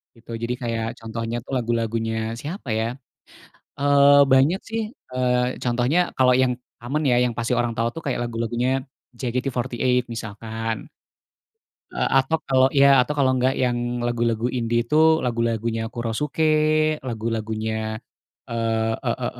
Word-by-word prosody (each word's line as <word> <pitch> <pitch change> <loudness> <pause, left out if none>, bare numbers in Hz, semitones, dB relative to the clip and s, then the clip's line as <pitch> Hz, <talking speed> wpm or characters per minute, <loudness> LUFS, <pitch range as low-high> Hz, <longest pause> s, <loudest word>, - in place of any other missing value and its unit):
gitu. 115 0 -14
Jadi 120 +1 -1
kayak 115 -1 -2
contohnya 115 +1 -4
tuh - - -11
lagu-lagunya 115 -1 -1 0.3
siapa 155 0 -7
ya, 110 - 0 0.9
eee, 140 0 +6
banyak 145 +9 +4
sih, 225 0 -2 0.3
eee, 125 0 0
contohnya 125 +6 +1 0.2
kalau 125 -1 +5
yang 125 -1 +2 0.3
aman 150 +5 -1
ya, 125 - +4
yang 120 -2 -1
pasti 120 +1 -1
orang 120 -1 -1
tahu 115 +1 +1
tuh 165 - -5
kayak 125 - -1
lagu-lagunya 120 +2 -1 0.4
JKT48 125 0 -1
misalkan. 110 +1 -4 1.2
Eee, - - 0
atau 145 +5 +1
kalau 130 -1 +5
ya, 140 - +8 0.2
atau 150 +4 -3
kalau 130 -2 +4
nggak 130 +2 +2
yang 120 -1 +1 0.2
lagu-lagu 120 -1 0
indie 120 -1 0
itu 135 +6 -1 0.3
lagu-lagunya 115 -2 -1
Kurosuke, 135 +7 -1 0.5
lagu-lagunya, 110 -1 -3 0.7
eee, 115 -1 0
e - - +2
e - - 0
120 Hz, 135 wpm, -23 LUFS, 115-130 Hz, 1.2 s, ya